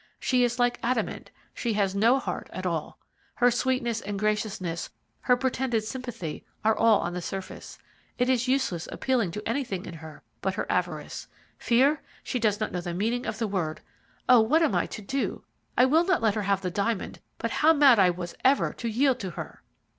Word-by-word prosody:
She 250 Hz, -1 st, +2 dB
is 240 Hz, 0 st, 0 dB
like 245 Hz, 0 st, +1 dB
adamant, 255 Hz, +2 st, -2 dB, 0.2 s
she 235 Hz, -2 st, -2 dB
has 200 Hz, -2 st, +1 dB
no 225 Hz, +6 st, +4 dB
heart -, -, -4 dB
at -, -, -6 dB
all. -, -, -2 dB, 0.4 s
Her 245 Hz, 0 st, +4 dB
sweetness 240 Hz, -2 st, 0 dB
and 205 Hz, 0 st, -4 dB
graciousness, 205 Hz, -5 st, -2 dB, 0.3 s
her 250 Hz, -, +3 dB
pretended 255 Hz, -3 st, 0 dB
sympathy, 230 Hz, -, -6 dB, 0.2 s
are 220 Hz, 0 st, +4 dB
all 225 Hz, -2 st, +4 dB
on 175 Hz, -, -3 dB
the 180 Hz, -, -3 dB
surface. 190 Hz, +2 st, -7 dB, 0.4 s
It 250 Hz, -, +2 dB
is 255 Hz, -1 st, +2 dB
useless 255 Hz, -11 st, 0 dB
appealing 250 Hz, -8 st, 0 dB
to 210 Hz, +5 st, -6 dB
anything 230 Hz, -7 st, -2 dB
in -, -, -7 dB
her 160 Hz, -1 st, -11 dB, 0.2 s
but 190 Hz, 0 st, -1 dB
her -, -, -2 dB
avarice. 175 Hz, -4 st, -2 dB, 0.3 s
Fear! 275 Hz, +5 st, +3 dB, 0.2 s
she 250 Hz, -, -2 dB
does 215 Hz, -2 st, +1 dB
not 215 Hz, -, -2 dB
know 180 Hz, -, -3 dB
the 175 Hz, -1 st, -4 dB
meaning 230 Hz, +6 st, -1 dB
of -, -, -3 dB
the 225 Hz, -1 st, -1 dB
word. 175 Hz, -6 st, -2 dB, 0.5 s
Oh, 250 Hz, -1 st, +8 dB
what 310 Hz, +10 st, +3 dB
am 310 Hz, -, +2 dB
I -, -, +1 dB
to 215 Hz, -, -8 dB
do? 270 Hz, +7 st, -2 dB, 0.3 s
I 250 Hz, -, +7 dB
will 315 Hz, +6 st, +4 dB
not 365 Hz, -8 st, +1 dB
let 220 Hz, -2 st, +3 dB
her 215 Hz, -, -1 dB
have 200 Hz, -1 st, +1 dB
the 180 Hz, -, -2 dB
diamond, 205 Hz, +2 st, -2 dB, 0.2 s
but -, -, -3 dB
how 310 Hz, +1 st, +4 dB
mad 280 Hz, -7 st, +6 dB
I 185 Hz, -2 st, +6 dB
was 175 Hz, -1 st, -4 dB
ever 270 Hz, +2 st, +3 dB
to 235 Hz, -, -5 dB
yield 255 Hz, +3 st, +2 dB
to 190 Hz, -, -4 dB
her!" 170 Hz, -, -8 dB
225 Hz, 200 wpm, -27 LUFS, 195-255 Hz, 0.5 s, Oh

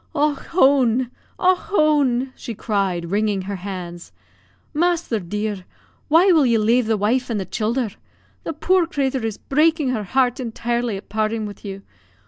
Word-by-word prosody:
"Och 295 Hz, -1 st, +1 dB
hone! 260 Hz, -6 st, +3 dB, 0.3 s
Och 370 Hz, 0 st, +4 dB
hone!" 285 Hz, -, +1 dB
she 230 Hz, -, -7 dB
cried, 190 Hz, -6 st, -1 dB
wringing 205 Hz, -1 st, 0 dB
her 200 Hz, +1 st, -4 dB
hands, 175 Hz, -, -7 dB, 0.6 s
"masther 335 Hz, -7 st, +1 dB
dear, 205 Hz, +1 st, -4 dB, 0.4 s
why 335 Hz, +5 st, +5 dB
will 320 Hz, -4 st, +5 dB
you 235 Hz, -1 st, +3 dB
lave 230 Hz, +2 st, +2 dB
the 220 Hz, -1 st, +2 dB
wife 235 Hz, +6 st, 0 dB
and 225 Hz, -3 st, -1 dB
the 190 Hz, -, -3 dB
childher? 225 Hz, +4 st, -1 dB, 0.5 s
The -, -, -4 dB
poor 360 Hz, +3 st, +2 dB
crathur 270 Hz, -5 st, -1 dB
is 220 Hz, -2 st, -3 dB
breakin' 305 Hz, 0 st, +2 dB
her 220 Hz, -5 st, -2 dB
heart 250 Hz, +4 st, +1 dB
intirely 235 Hz, -2 st, -2 dB
at 195 Hz, -, -11 dB
partin' 215 Hz, +1 st, -1 dB
wid 205 Hz, -1 st, -9 dB
you. 195 Hz, -1 st, -7 dB
235 Hz, 155 wpm, -21 LUFS, 205-280 Hz, 0.6 s, why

